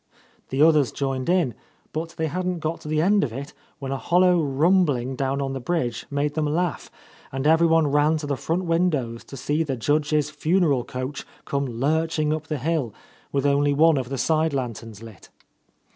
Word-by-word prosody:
The 135 +3 +2
others 155 -5 +4
joined 135 0 -2
in, 175 -9 +2 0.4
but 165 +2 -4
they 160 - 0
hadn't 180 +3 -2
got 160 +1 -3
to - - -10
the 155 +1 +1
end 200 +3 +3
of 135 - -2
it 135 +5 -7 0.2
when 135 -1 -5
a 135 - -1
hollow 180 +1 +3
rumbling 140 -3 +2
down 135 +1 -1
on 135 0 -3
the 135 - -3
bridge 125 -5 -2
made 145 0 -1
them 155 -1 0
laugh, 170 +2 -1 0.4
and 135 +1 -3
everyone 165 0 +4
ran 145 +2 +2
to 150 - -5
the 145 -1 -1
front 170 +7 -2
windows 155 -9 0
to 135 - -10
see 145 +5 -1
the 140 -5 -2
Judge's 150 +3 +1
funeral 155 -3 +1
coach 130 +3 -5 0.2
come 140 0 -1
lurching 155 +5 0
up 155 0 -4
the 155 - -2
hill, 140 -5 -1 0.4
with 140 0 0
only 145 0 +3
one 160 +1 +5
of 130 -2 -3
the 135 - -3
side 155 +1 +1
lanterns 115 -4 -5
lit. 110 -8 -13
150 Hz, 190 wpm, -24 LUFS, 135-160 Hz, 0.4 s, one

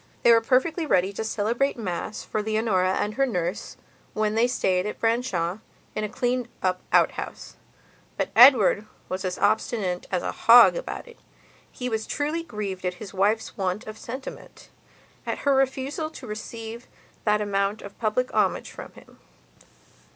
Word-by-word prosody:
They 235 - +7
were 230 0 +6
perfectly 305 +8 +1
ready 190 -4 +2
to 220 - -4
celebrate 230 +6 0
Mass 210 0 -4
for 215 - -2
Leonora 210 -4 +1
and 210 +2 -1
her 270 +4 +2
nurse, 180 -4 -3 0.4
when 215 0 +1
they 225 +2 +3
stayed 185 -5 0
at 210 - -6
Branshaw, 220 -6 0 0.3
in 215 - -3
a 210 - -2
cleaned 245 +2 -1 0.2
up 185 -1 0
outhouse. - - 0 0.6
But - - -1
Edward 225 -4 +7 0.2
was 185 +1 -3
as 185 -1 -2
obstinate 205 -3 0
as 180 -2 0
a - - -2
hog 235 +1 +7
about - - -5
it. 475 - -15 0.5
He 250 - -5
was 220 -2 -2
truly 300 +3 -1
grieved 210 - -5
at 180 0 -2
his 200 +1 -10
wife's 205 +4 0
want 190 +1 -2
of 215 - -7
sentimentat 260 +4 -9 0.6
her 280 - +1
refusal 270 +3 0
to 290 - -11
receive 225 +1 -7 0.4
that 210 -1 +3
amount 200 0 -1
of 200 - -10
public 235 +3 0
homage - - +1
from - - -10
him. - - -18
215 Hz, 160 wpm, -25 LUFS, 195-250 Hz, 0.6 s, They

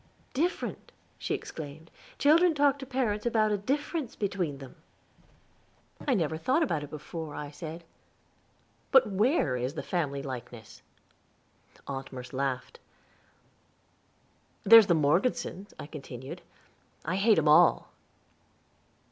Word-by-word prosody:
"Different!" 330 +7 -2 0.3
she - - -1
exclaimed, 155 +1 -9 0.3
"children 325 +3 +5
talk 285 -1 +3
to 270 - -8
parents 240 -5 -1
about 220 -2 +2
a 205 - +1
difference 290 - -2
between 185 -8 -2
them." 135 -2 -11 1.3
"I 265 - +3
never 160 -5 0
thought 265 - +2
about 160 - -1
it 145 - -8
before." 155 0 -7
I 145 -1 -6
said, 160 +3 -8 1.1
"but 265 -2 +7
where 205 - +1
is 125 +4 -3
the - - -4
family 140 -6 -2
likeness?" 125 -4 -8 1.0
Aunt 135 -1 -6
Merce 125 -1 -9
laughed. 130 -1 -3 1.8
"There's 225 0 +9
the 175 - +4
Morgesons," 190 - 0
I - - -7
continued, 135 -4 -9 0.6
"I 185 - -1
hate 210 +2 +4
'em 160 -1 +2
all." 150 - +5
175 Hz, 120 wpm, -29 LUFS, -, 1.8 s, There's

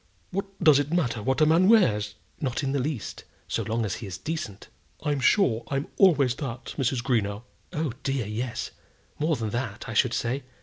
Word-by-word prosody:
What 195 +2 -2 0.2
does 150 -4 +7
it 145 +1 -1
matter 140 -11 +1
what 130 +8 0
a - - +7
man 165 +5 +5
wears?" 105 - +4 0.2
"Not 130 0 -1
in 135 - 0
the 140 - +1
least, 130 -4 -3 0.2
so - - -1
long 115 0 -1
as 100 - -2
he 110 - -7
is 90 -2 -5
decent." 155 -11 -5 0.4
"I'm 145 -2 0
sure 125 - +3
I'm 140 +1 -2
always 145 - +5
that, 130 -4 -5
Mrs. 130 -3 0
Greenow." 110 -4 0 0.3
"Oh, 150 -5 -2
dear, 135 -4 -1
yes. 115 +3 -3 0.5
More 155 +1 +2
than 110 -4 -3
that, 120 -2 -3
I 115 - -4
should 115 +2 +3
say. 125 +4 -1
130 Hz, 190 wpm, -27 LUFS, 115-150 Hz, 0.5 s, does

